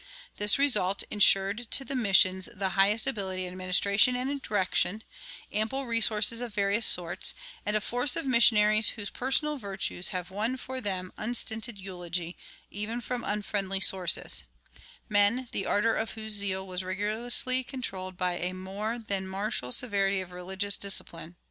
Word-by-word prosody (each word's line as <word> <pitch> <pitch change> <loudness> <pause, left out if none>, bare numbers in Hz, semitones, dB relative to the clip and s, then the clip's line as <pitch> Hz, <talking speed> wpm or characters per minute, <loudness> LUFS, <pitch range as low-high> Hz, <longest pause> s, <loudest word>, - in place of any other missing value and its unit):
This 205 0 +3
result 210 -9 +2
insured 205 +2 +3
to 270 - +4
the 275 - -5
missions 190 -5 +3
the 190 0 -1
highest 200 +4 +3
ability 190 -7 -3
in 180 - -5
administration 200 +6 +2
and 270 +3 -2
direction, 205 0 0 0.5
ample 220 +6 -2
resources 230 -1 +3
of 240 -4 -6
various 205 +2 +2
sorts, 175 -1 +2 0.3
and 210 - 0
a 215 - +1
force 245 +4 +1
of 330 - -3
missionaries 215 -4 +5
whose 205 -2 -4
personal 285 +3 0
virtues 195 -3 -2
have 180 -1 -4
won 220 +6 -2
for 260 +1 -6
them 185 -3 -4
unstinted 225 -1 0
eulogy 175 -2 -5 0.4
even 210 +4 -4
from 245 0 -5
unfriendly 200 -2 -2
sources 185 -2 +2 0.7
men 210 +5 +2
the 195 - -3
ardor 225 +2 +1
of 220 0 -3
whose 220 -1 -4
zeal 195 -2 0
was 185 0 -4
rigorously 225 +7 +1
controlled 190 -9 -6
by 180 -1 -1
a 180 +1 -3
more 195 +5 -4
than 200 -4 -4
martial 190 - -3
severity 200 - 0
of 185 -1 -7
religious 190 +2 -2
discipline. 175 -3 -3
205 Hz, 150 wpm, -28 LUFS, 190-230 Hz, 0.7 s, missionaries